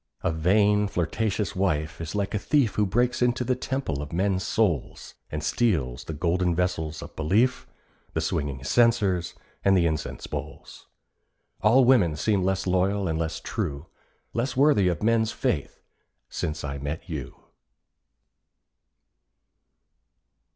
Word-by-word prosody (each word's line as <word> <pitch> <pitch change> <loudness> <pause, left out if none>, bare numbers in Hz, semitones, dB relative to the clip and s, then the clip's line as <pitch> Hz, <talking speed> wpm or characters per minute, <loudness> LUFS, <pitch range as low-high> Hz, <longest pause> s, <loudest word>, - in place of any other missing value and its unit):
A - - +1
vain, 100 +5 +3
flirtatious 100 +3 -1
wife 85 -4 -1
is 85 +4 -5
like 100 -1 -1
a 105 - 0
thief 125 -3 +2
Who 105 -1 +1
breaks 120 +7 +1
into 125 0 +2
the 125 +1 +1
temple 130 - -3
of 75 +1 -7
men's 95 +2 0
souls, 95 - -1 0.2
And 75 0 -4
steals 75 - 0
the 80 - -5
golden 85 +2 0
vessels 80 -3 -2
of - - -11
belief, 105 - +1 0.5
The - - 0
swinging 70 -3 -2
censers, 100 - +2 0.3
and 95 -1 +4
the 85 - +3
incense 80 -2 -2
bowls. - - -8 0.7
All 125 +4 +5
women 105 -12 +4
seem 100 +5 +1
less 95 +1 0
loyal 95 +2 +1
and 80 -1 -1
less 80 0 -2
true, 80 -7 -4 0.5
Less 125 +3 -2
worthy 135 -9 +4
of 85 -1 -1
men's 115 0 +2
faith 70 - -2 0.5
since 75 -1 -3
I 70 -1 -4
met 75 +4 -5
you. 75 -8 -6
95 Hz, 135 wpm, -26 LUFS, 80-110 Hz, 0.7 s, All